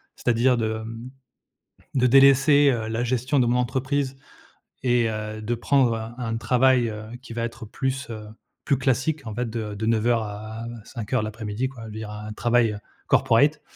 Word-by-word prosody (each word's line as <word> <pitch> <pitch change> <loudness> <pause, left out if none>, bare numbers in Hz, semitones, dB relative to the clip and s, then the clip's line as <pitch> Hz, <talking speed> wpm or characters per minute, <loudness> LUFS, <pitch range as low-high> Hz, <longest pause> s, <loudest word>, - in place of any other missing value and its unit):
c'est-à-dire 125 +1 +2
de, 110 -1 -1
mmh, 115 +2 -7 0.9
de 125 -1 +4
délaisser, 140 +2 +6
heu, 110 -2 -3
la 115 +2 -1
gestion 130 +3 0
de 125 - +4
mon 120 +1 +2
entreprise 130 +2 -1 0.7
et 120 -2 +2
heu, 110 0 -5
de 115 +3 -1
prendre 125 0 +2
un 115 +1 -6
un 115 -3 -2
travail, 125 0 +3
heu, 105 0 -6 0.2
qui 120 - -10
va 115 0 -2
être 115 -1 -5
plus, 130 +3 -3
heu, 110 -2 -7 0.4
plus 140 - +2
classique 135 +3 0
en 110 - -5
fait 120 +2 -2
de 110 -2 -4
de 105 +2 -3
09:00 115 +1 +2
à 110 +2 -7 0.2
17:00 115 +1 -3
de - - -2
l'après-midi 110 +3 -3
quoi. 125 -4 -11
Je - - -7
veux - - -9
dire 110 0 -6
un, 105 0 -7
travail 115 -1 +2 0.3
corporate 145 +6 +3
120 Hz, 185 wpm, -24 LUFS, 110-130 Hz, 0.9 s, délaisser